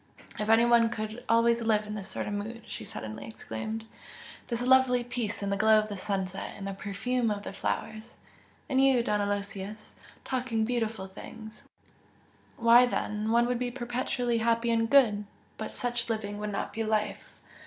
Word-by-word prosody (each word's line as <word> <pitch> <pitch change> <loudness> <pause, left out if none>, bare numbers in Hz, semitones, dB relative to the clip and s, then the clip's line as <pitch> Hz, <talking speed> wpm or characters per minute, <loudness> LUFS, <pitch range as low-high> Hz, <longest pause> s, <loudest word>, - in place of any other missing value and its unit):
"If 210 - -1
one 230 +1 +5
could 220 +1 -5
always 230 +1 +4
live 215 -2 +2
in 210 - -6
this 205 -2 -6
sort - - -3
of 205 - -3
mood!" 220 +3 -5
she - - -6
suddenly 110 +1 -6
exclaimed 215 - -5 0.6
"This 235 0 -2
lovely 255 -1 +5
peace 235 -4 -3
in 200 - -1
the 200 - +1
glow 220 +2 +6
of 215 0 +1
the 205 - -4
sunset 190 -1 -3
and 195 - -7
the 195 - -3
perfume 220 +5 -1
of 205 -1 -2
the - - -6
flowers! 220 +3 -4 0.5
and 265 -2 +3
you, 260 -3 +4
Don 210 -2 +1
Aloysius, 200 +1 -4 0.3
talking 245 -4 0
beautiful 225 -4 -1
things! 220 +3 -10 1.0
why 235 +2 +7
then, 210 -2 -2
one 235 +1 +4
would 245 0 0
be 250 0 -1
perpetually 245 -1 -1
happy 230 +1 +2
and 225 0 +2
good! 220 -7 +5 0.3
But - - -4
such 240 -1 -2
living 205 -2 -3
would 210 0 -3
not 200 - -3
be 225 - -2
life! 215 -1 -2
225 Hz, 175 wpm, -29 LUFS, 210-240 Hz, 1.0 s, why